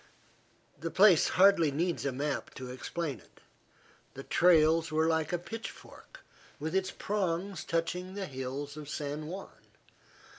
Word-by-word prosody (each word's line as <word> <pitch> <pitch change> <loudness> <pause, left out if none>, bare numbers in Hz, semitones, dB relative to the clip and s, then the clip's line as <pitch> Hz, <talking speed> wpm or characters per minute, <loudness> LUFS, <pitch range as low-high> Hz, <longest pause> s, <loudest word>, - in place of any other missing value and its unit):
The 165 - -3
place 190 -2 +6
hardly 185 -4 +6
needs 165 +2 -1
a - - 0
map 140 +2 -3
to 130 -1 -7
explain 140 +1 -4
it. - - -22 0.8
The 135 - -7
trails 165 -1 +4
were 155 +1 +2
like 160 -1 +1
a 175 - +1
pitchfork, 225 - -10 0.4
with 160 +2 -3
its 190 0 +1
prongs 195 -3 -2
touching 180 +3 -2
the 200 -1 -3
hills 135 0 -5
of 150 -2 -8
San 150 +1 -4
Juan. 190 +4 -7
165 Hz, 140 wpm, -31 LUFS, 145-185 Hz, 0.8 s, place